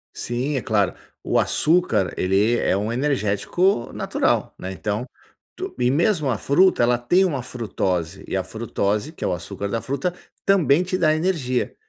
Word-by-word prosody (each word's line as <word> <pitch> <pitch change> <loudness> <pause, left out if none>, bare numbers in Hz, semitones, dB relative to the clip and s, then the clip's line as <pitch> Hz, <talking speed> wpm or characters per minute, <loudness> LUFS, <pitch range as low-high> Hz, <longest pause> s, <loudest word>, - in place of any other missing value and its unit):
Sim, 125 +5 -2
é 130 - 0
claro, 105 -3 +1 0.3
o - - +2
açúcar 165 - +2
ele 100 +6 +2
é 95 - +1
um 105 +3 -2
energético 130 - 0
natural, - - 0
né, 95 - -5
então 105 +6 -3 0.5
tu - - -6
e 125 0 +3
mesmo 155 +1 +2
a 120 - 0
fruta 155 - +3
ela 120 0 +3
tem 180 +10 +3
uma 145 -8 -1
frutose, 95 -7 -3
e 95 - -1
a 95 - -1
frutose 110 +4 -2
que - - -9
é - - +1
o - - 0
açúcar 90 +4 -5
da 115 +2 -2
fruta, 140 +6 -2 0.3
também 180 -4 +4
te 185 +1 -2
dá 155 -2 +3
energia. 155 -7 -1
125 Hz, 170 wpm, -22 LUFS, 105-155 Hz, 0.5 s, também